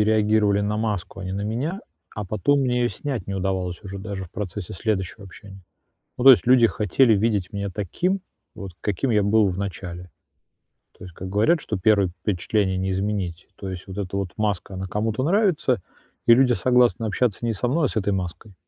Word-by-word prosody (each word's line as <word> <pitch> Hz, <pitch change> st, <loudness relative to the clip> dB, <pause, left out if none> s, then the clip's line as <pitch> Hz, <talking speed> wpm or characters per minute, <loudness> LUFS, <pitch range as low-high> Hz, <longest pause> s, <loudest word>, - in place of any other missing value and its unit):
реагировали 105 Hz, -1 st, +3 dB
на 105 Hz, +1 st, -1 dB
маску, 105 Hz, -3 st, -3 dB
а 95 Hz, -, -6 dB
не 95 Hz, -, -4 dB
на 100 Hz, -, -3 dB
меня, 135 Hz, -, -2 dB, 0.3 s
а 105 Hz, -, -4 dB
потом 110 Hz, +9 st, +1 dB
мне 125 Hz, -2 st, +1 dB
её 120 Hz, -, +2 dB
снять 130 Hz, -7 st, -4 dB
не 100 Hz, -, -4 dB
удавалось 95 Hz, -2 st, -2 dB
уже 100 Hz, 0 st, -7 dB
даже 100 Hz, -1 st, -5 dB
в 85 Hz, -, -15 dB
процессе 100 Hz, -2 st, -5 dB
следующего 100 Hz, +1 st, -3 dB
общения. 95 Hz, 0 st, -13 dB, 0.6 s
Ну, 125 Hz, -, -2 dB
то 135 Hz, -, +11 dB
есть, 125 Hz, -, +4 dB
люди 125 Hz, -2 st, +6 dB
хотели 110 Hz, +4 st, +3 dB
видеть 100 Hz, -3 st, 0 dB
меня 100 Hz, 0 st, -3 dB
таким, 140 Hz, -, -2 dB, 0.3 s
вот 100 Hz, -2 st, -7 dB
каким 105 Hz, +5 st, -1 dB
я 105 Hz, -, +3 dB
был 105 Hz, 0 st, +4 dB
в 90 Hz, -, -3 dB
начале. 90 Hz, -2 st, -6 dB, 0.9 s
То -, -, -11 dB
есть, 90 Hz, -, -11 dB
как 95 Hz, -, -7 dB
говорят, 110 Hz, -, +2 dB
что 105 Hz, -, -3 dB
1 100 Hz, 0 st, +3 dB
впечатление 95 Hz, +2 st, -1 dB
не 95 Hz, +1 st, -1 dB
изменить. 95 Hz, -3 st, -2 dB
То 95 Hz, -, -6 dB
есть 95 Hz, 0 st, -7 dB
вот 95 Hz, -, -8 dB
эта 100 Hz, -1 st, -3 dB
вот 95 Hz, -3 st, -3 dB
маска, 105 Hz, -2 st, -2 dB
она 95 Hz, 0 st, -4 dB
кому-то 110 Hz, +5 st, -1 dB
нравится, 175 Hz, -, +2 dB, 0.5 s
и 115 Hz, -, +8 dB
люди 125 Hz, 0 st, +4 dB
согласны 125 Hz, -1 st, +3 dB
общаться 110 Hz, +1 st, 0 dB
не 115 Hz, -2 st, 0 dB
со 120 Hz, +5 st, -1 dB
мной, 150 Hz, +2 st, +2 dB
а -, -, 0 dB
с -, -, -8 dB
этой 100 Hz, -1 st, +1 dB
маской. 95 Hz, +2 st, -5 dB
105 Hz, 200 wpm, -23 LUFS, 95-115 Hz, 0.9 s, то